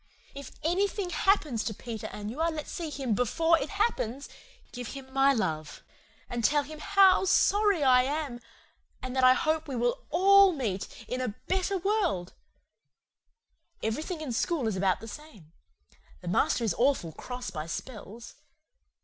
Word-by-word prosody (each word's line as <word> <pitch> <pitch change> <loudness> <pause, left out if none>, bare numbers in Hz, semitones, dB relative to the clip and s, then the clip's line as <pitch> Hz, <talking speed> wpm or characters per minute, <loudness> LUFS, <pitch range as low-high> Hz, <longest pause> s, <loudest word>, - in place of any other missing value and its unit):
If 280 -1 -9
ANYTHING 380 +3 0
HAPPENS 310 - +1
to 220 - -3
Peter 225 -1 -6
and 210 +1 -6
you 285 +7 -5
are 335 - +2
let 310 -2 -5
see 335 -2 -5
him 270 -5 -2
BEFORE 325 +9 +2
IT 280 - -4
HAPPENS 290 - -1 0.4
give 245 -2 -6
him 265 -1 -10
MY 270 +1 +4
LOVE 155 - -3 0.4
and 240 -1 -4
tell 290 +4 +3
him 305 +2 -10
HOW 390 +1 +5
SORRY 400 -2 +3
I 255 -2 +6
AM, 280 -2 -3 0.6
and 255 0 -5
that 260 - +1
I 255 0 +7
hope 315 +1 0
we 270 - -4
will 240 0 -1
ALL 390 +2 +6
meet 215 - -3 0.2
in 255 +1 -3
A 235 -5 -3
BETTER 380 +1 0
WORLD 365 - -1 1.5
Everything 310 - -3
in 280 -6 -4
school 290 0 0
is 215 - -1
about 190 -1 +1
the 225 - -8
same. 215 - -12 0.7
The 180 - -10
master 185 +6 +1
is 215 -6 +1
awful 250 - +2
cross 250 +8 -7
by 155 -1 -5
spells. 225 +3 -8
270 Hz, 160 wpm, -28 LUFS, 230-330 Hz, 1.5 s, I